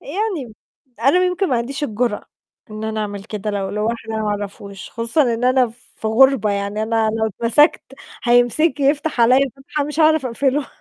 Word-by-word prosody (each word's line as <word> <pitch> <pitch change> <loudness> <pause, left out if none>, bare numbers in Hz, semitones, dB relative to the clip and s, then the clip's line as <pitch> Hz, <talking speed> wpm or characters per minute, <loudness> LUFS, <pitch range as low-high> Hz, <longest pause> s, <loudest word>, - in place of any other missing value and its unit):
يعني 335 - -4 0.5
أنا 275 +8 +4
يمكن 365 +1 0
ما 255 - +1
عنديش 270 +5 -3
الجُرأة 225 -3 -2 0.5
إن 215 +1 -6
أنا 220 0 -3
أعمل 205 -2 -5
كده، 210 -1 -4
لو 200 -2 -2
لواحد 225 +2 -3
أنا 220 0 -2
ما 210 - -1
أعرفوش، 200 -1 -6
خصوصًا 230 +6 0
إن 235 +2 -3
أنا 255 0 +4 0.3
في - - -5
غُربة، 240 -1 +4
يعني 200 +1 -2
أنا 225 0 +1
لو 220 0 -1
اتمسكت، 235 - +2 0.4
هيمسكني 245 +5 +3
يفتح 295 -1 0
عليّا 255 +3 +4
فتحة 285 +2 -3
مش 300 +2 -3
هعرف 310 -3 +4
أقفله. 270 +4 0
235 Hz, 170 wpm, -19 LUFS, 215-280 Hz, 0.5 s, أنا